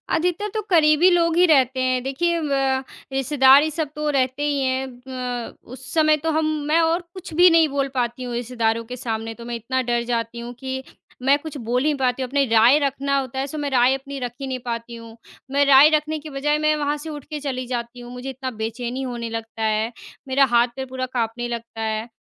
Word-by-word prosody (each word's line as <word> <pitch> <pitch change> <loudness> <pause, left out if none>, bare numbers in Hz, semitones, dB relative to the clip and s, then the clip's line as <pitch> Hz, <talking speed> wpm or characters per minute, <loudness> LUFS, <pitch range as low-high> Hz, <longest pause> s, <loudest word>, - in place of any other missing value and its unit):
अधिकतर 355 +5 0
तो 435 - -1
क़रीबी 320 0 +5
लोग 335 -2 +2
ही 360 - +6
रहते 265 -5 +3
हैं। 255 -1 +1
देखिए 335 +6 0
ब 270 -3 0 0.3
रिश्तेदार 270 +1 +5
ये 315 - 0
सब 310 -2 -3
तो 300 0 -1
रहते 260 +2 0
ही 290 -2 0
हैं 260 0 -1 0.2
ब 250 -2 -4 0.2
उस 260 +1 -9
समय 310 -1 +4
तो 325 - +1
हम 315 - +1 0.2
मैं 320 +2 +3
और 330 +2 +1
कुछ 370 -3 -9
भी 355 +2 +7
नहीं 330 -1 +5
बोल 275 0 -1
पाती 245 0 -1
हूँ 245 -1 -5
रिश्तेदारों 230 -1 -1
के 250 - -3
सामने 225 -2 -4
तो 235 - -8
मैं 240 0 -4
इतना 255 +3 -2
डर 235 0 +1
जाती 235 -1 -3
हूँ 240 +1 -7
कि 265 0 -4 0.4
मैं 275 +2 +4
कुछ 310 -1 -8
बोल 250 +2 +1
ही 305 - +3
पाती 255 +1 +1
हूँ, 255 - -3
अपनी 280 0 +2
राय 230 +5 +6
रखना 275 0 0
होता 265 0 -5
है 275 - -1
सो 305 - -6
मैं 290 -1 -2
राय 250 +1 +4
अपनी 275 +1 -7
रख 245 -2 -3
ही 270 - -3
नहीं 260 -1 -3
पाती 235 0 -4
हूँ। 230 0 -12 0.3
मैं 285 +1 +3
राय 280 +2 +8
रखने 305 +1 0
की 305 +1 -9
बजाय 295 +2 0
मैं 305 0 +2
वहाँ 295 0 -1
से 315 +2 -8
उठके 300 0 -6
चली 260 -3 -4
जाती 240 0 -4
हूँ, 240 0 -10
मुझे 250 +2 -6
इतना 260 0 -5
बेचैनी 235 +3 -4
होने 240 -3 -4
लगता 225 0 -6
है, 220 +1 0 0.4
मेरा 270 +1 +4
हाथ-पैर 240 +2 +2
पूरा 255 0 -3
काँपने 240 0 -2
लगता 230 -1 -6
है। 220 +1 -2
265 Hz, 225 wpm, -22 LUFS, 240-295 Hz, 0.4 s, राय